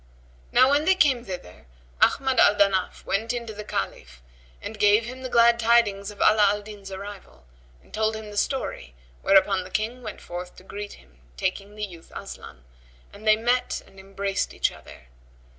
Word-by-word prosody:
Now 255 - +6
when 290 +2 +3
they 380 - +5
came 270 -9 +3
thither, 180 - -9 0.3
Ahmad 265 -2 +3
al 205 - +6
Danaf 195 -2 +1
went 220 +4 -1
in 240 -1 -4
to 220 - -7
the 210 0 -7
Caliph 65 - -5 0.4
and 215 0 -8
gave 210 +2 +5
him 255 +2 -8
the 260 - -5
glad 235 0 +5
tidings 225 -4 +3
of 205 - -11
Ala 215 -1 +5
al 205 +1 -1
Din's 205 -2 -10
arrival—and 60 - -12
told 220 0 0
him 220 0 -7
his 205 -1 -3
story 265 - -3 0.3
whereupon 195 -1 +4
the 185 - -11
King 225 +6 -2
went 215 -4 -7
forth 180 +1 -7
to - - -15
greet 205 +2 -7
him - - -20 0.2
taking 200 +2 -3
the 210 0 -3
youth 170 -4 -14
Aslan, 65 - -9 0.5
and 210 +2 -10
they 215 - +7
met 245 +3 0
and 195 - -17
embraced 195 0 -3
each - - +1
other. 65 - -14
205 Hz, 180 wpm, -25 LUFS, 190-230 Hz, 0.5 s, they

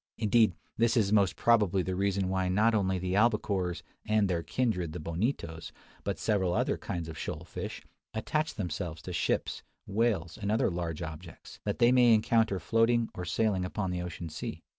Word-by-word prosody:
Indeed, 110 -3 +3 0.2
this 115 +1 +3
is 105 -2 +2
most 100 -3 +3
probably 105 -6 +3
the 95 - -2
reason 100 0 0
why 95 -1 0
not 110 +5 +3
only 95 -3 +1
the 90 0 -2
albacores 100 -4 +1 0.2
and 105 -1 +2
their 85 -3 0
kindred 90 -7 -1
the 90 - -5
bonitos, 85 - -3 0.3
but - - -2
several 95 -5 +1
other - - +1
kinds 85 -2 -5
of 80 - -7
shoal - - -4
fish, - - -6 0.3
attach 155 +8 -1
themselves 85 -4 -4
to 90 - -6
ships, 85 - -1 0.2
whales, 100 -6 0
and 100 -1 -1
other 110 -3 +2
large 85 -2 -3
objects, 80 +1 -9
that - - -1
they 120 +1 +5
may 120 -2 +6
encounter 110 -2 +2
floating 115 +6 +2
or 90 - -5
sailing 100 0 +1
upon 95 +1 -2
the 90 -1 -2
open 90 -1 -6
ocean. 75 - -5
95 Hz, 180 wpm, -30 LUFS, 90-110 Hz, 0.3 s, may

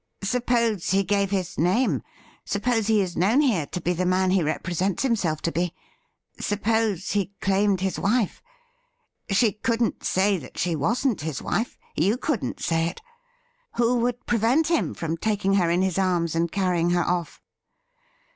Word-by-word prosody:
Suppose 235 -3 0
he 195 +1 +3
gave 200 +1 +1
his 190 -1 -2
name; 185 +10 +2 0.4
suppose 225 +1 0
he 220 -2 +4
is 180 -3 -3
known 210 +10 +3
here 215 - +2
to 180 - -4
be 175 +1 0
the 180 +1 -1
man 185 0 +2
he 190 -1 +3
represents 175 - -1
himself 195 - 0
to 170 - 0
be; 175 0 -2 0.6
suppose 210 -2 0
he 200 -1 -1
claimed 195 -1 +1
his 190 -1 -1
wife. 215 0 0 0.9
She 210 +2 +3
couldn't 230 +2 -1
278 190 +1 +1
THE 205 - +3
RIDDLE - - +3
RING 185 - -2
say - - -12
that - - -19
she 170 -2 0
wasn't 230 - 0
his 155 -3 -4
wife; 225 +4 -2 0.2
you 200 +9 +2
couldn't 265 -4 -2
say 165 0 +1
it. 170 - -6 0.8
Who 240 +1 +2
would 245 0 -1
prevent 240 +8 +2
him 335 -3 0
from 165 0 -3
taking 205 0 0
her 180 -4 +3
in 175 +2 +2
his 190 -1 0
arms 175 -4 +1
and 165 0 0
carrying 180 -3 +1
her 175 0 +2
off 175 -2 -2
195 Hz, 175 wpm, -25 LUFS, 175-225 Hz, 0.9 s, he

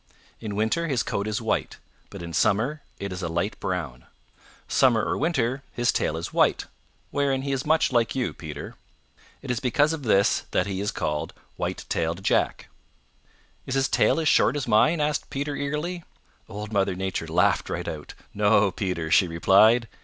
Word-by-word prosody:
In 105 -3 -5
winter 110 +11 0
his 130 -8 0
coat 100 +1 -2
is 110 +2 -2
white, 110 - -1 0.3
but 100 -3 -9
in 85 0 -7
summer 125 - +1 0.2
it 100 -1 -5
is 90 - -6
a 85 - -2
light 85 +6 -2
brown. 80 -10 -4 0.6
Summer 120 -4 +3
or - - 0
winter 135 -4 0
his 120 0 +1
tail 80 - -1
is 85 - -6
white, - - +2 0.5
wherein 135 -2 0
he 140 - -2
is 135 +1 -2
much 160 -2 +3
like 120 -3 +1
you, 130 -2 -1
Peter. 75 -3 -8 0.7
It 135 - -3
is 120 - -1
because 145 +6 +2
of 160 - -5
this 100 -5 +2
that 90 - +1
he 95 -1 -3
is 105 - -1
called 75 +2 -3 0.2
White - - -4
tailed 85 +3 -2
Jack." - - +1 1.0
"Is 130 - -2
his 135 0 +2
tail - - +2
as 160 - 0
short - - +4
as 145 -2 -3
mine?" 155 +10 +4
asked 150 -1 -1
Peter 145 +1 -3
eagerly. 150 +5 -3 0.5
Old 105 0 -7
Mother 100 -2 +1
Nature 95 0 -3
laughed - - +2
right - - -4
out. 75 -2 -7 0.2
"No, 105 -1 +3
Peter," 90 -6 -3
she 95 - +5
replied. 105 +8 +4
110 Hz, 180 wpm, -25 LUFS, 95-135 Hz, 1.0 s, she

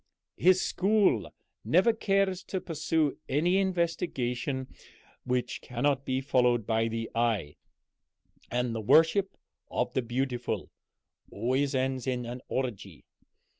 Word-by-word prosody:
His 185 +1 +5
school 195 - +2 0.3
never 180 - +4
care 195 -2 +2
to 185 +1 -5
pursue 160 -3 -1
any 175 +7 +2
investigation 155 -8 -1 0.6
which 125 0 -1
cannot 135 +3 -1
be 130 0 0
followed 125 -4 +2
by 115 0 +1
the 115 0 -3
eye 110 -10 0 0.9
and 125 -1 -1
the 115 - -3
worship 165 - +4 0.3
of - - -1
the 130 - +1
beautiful 125 +1 -3 0.6
always 130 +6 0
ends 130 0 -1
in 125 -2 -1
an 120 +1 -6
orgy. 100 - -4
130 Hz, 115 wpm, -29 LUFS, 120-165 Hz, 0.9 s, His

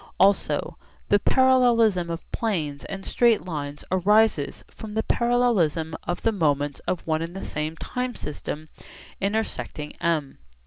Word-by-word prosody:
Also 195 +1 +2 0.3
the 205 - +5
parallelism 235 -8 +4
of 165 0 -6
planes 155 - -2
and 195 -1 -6
straight 235 -5 +3
lines 145 -4 -5
arises 200 -3 +3
from 215 -1 -9
the 220 - +1
parallelism 205 -11 +1
of 175 - -2
the 225 - +3
moments 145 -7 0
of 180 - -2
one 155 -1 0
and 165 +2 -5
the 195 - -5
same 155 +1 -3
time 250 +6 -3
system 150 +1 -6 0.5
intersecting 195 -7 -2
M. 155 -5 -1
185 Hz, 135 wpm, -25 LUFS, 155-220 Hz, 0.5 s, the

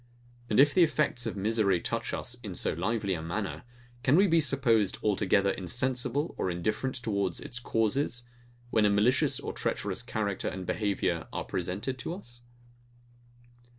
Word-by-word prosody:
And 105 - +3
if 145 +1 +6
the 185 - +4
effects 150 -7 +2
of 110 - -4
misery 100 -2 +2
touch - - -2
us 120 - -2
in 100 -6 -6
so - - +2
lively 100 +3 -1
a 80 - -3
manner; 95 +5 -3 0.4
can 135 +4 +4
we 195 +4 +6
be 165 -3 +4
supposed 125 -8 +2
altogether 100 -1 +2
insensible 125 - -1
or - - 0
indifferent 105 +9 -1
towards 100 -6 -1
its 125 - -5
causes; 120 +2 0 0.5
when 110 - +3
a - - +5
malicious 105 +6 +3
or - - -5
treacherous - - -2
character 100 -3 -2
and 95 -1 -4
behaviour 95 -5 -1
are - - -3
presented 95 +9 -3
to 165 - -4
us? 120 -11 -14
110 Hz, 155 wpm, -29 LUFS, 100-130 Hz, 0.5 s, if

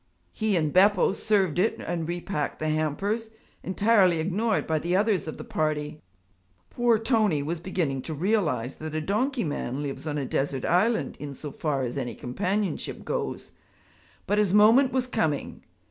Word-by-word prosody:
He 215 -2 0
and 155 -3 0
Beppo 195 0 +5
served 195 -6 +1
it 215 +5 +2
and 165 -2 -3
repacked 175 -3 -3
the 155 - -2
hampers, 195 +9 -1 0.3
entirely 190 -2 +3
ignored 195 +7 0
by 160 -1 0
the 175 +3 -1
others 200 -3 +1
of 155 - -5
the - - -7
party. 155 -7 -2 0.7
Poor 240 -2 +3
Tony 215 - +1
was 165 +3 -3
beginning 165 -7 -2
to 160 +4 -5
realize 150 - 0
that 155 0 -6
a - - +1
donkey 235 - 0
man 145 -3 -3
lives 145 +2 -5
on 150 -1 -2
a 140 - -2
desert 135 0 -1
island 220 +7 +1
in 145 -2 -6
so 150 +2 -7
far 140 -2 -1
as 120 -1 -3
any 120 - -4
companionship 185 +9 -2
goes. - - -3 0.7
But 205 +2 +1
his 205 -2 +2
moment 230 +6 +6
was 260 -1 0
coming. 210 - -2
175 Hz, 165 wpm, -26 LUFS, 150-210 Hz, 0.7 s, moment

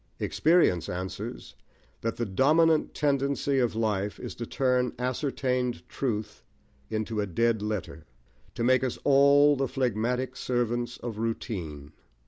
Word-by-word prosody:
Experience 155 - +2
answers 90 +1 -6 0.5
that 115 - -2
the 120 - -2
dominant 155 - +3
tendency 140 -1 +1
of 120 -3 +1
life 105 -3 -1
is - - -6
to 120 - -6
turn 125 -2 +1
ascertained 125 -1 -1
truth 105 -5 -3 0.5
into 110 0 -2
a 100 - -2
dead 115 +4 +1
letter, 105 -7 -4 0.5
to - - -2
make 130 +2 +4
us 130 - -2
all 140 +1 +6
the 135 0 0
phlegmatic 125 +1 -1
servants 120 -1 -1
of 115 -3 -6
routine. 85 - -4
120 Hz, 125 wpm, -28 LUFS, 110-135 Hz, 0.5 s, all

